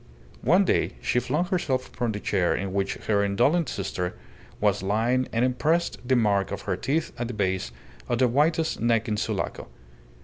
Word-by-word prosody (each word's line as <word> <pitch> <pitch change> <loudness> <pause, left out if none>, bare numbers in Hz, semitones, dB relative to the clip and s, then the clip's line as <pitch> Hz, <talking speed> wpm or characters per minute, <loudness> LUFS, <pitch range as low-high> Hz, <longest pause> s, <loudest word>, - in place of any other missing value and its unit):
One - - +4
day - - +1
she 125 - +1
flung 150 +8 0
herself 160 -9 -1
upon 120 -2 -2
the 105 - -4
chair 95 -4 +1
in 95 -1 -3
which 100 0 0
her 100 -2 +2
indolent 125 - +2
sister 90 -5 -3 0.4
was 105 -2 +2
lying 115 +6 +1
and 115 +2 +2
impressed 155 +7 0
the 130 +1 +2
mark 100 -5 +2
of - - -4
her - - -1
teeth 155 +4 -1
at 120 - -1
the 125 - -6
base 95 - -1 0.4
of 120 - +1
the 130 +1 +4
whitest 155 +6 +1
neck 115 0 +2
in 105 - 0
Sulaco. 105 - -3
115 Hz, 180 wpm, -26 LUFS, 100-130 Hz, 0.4 s, One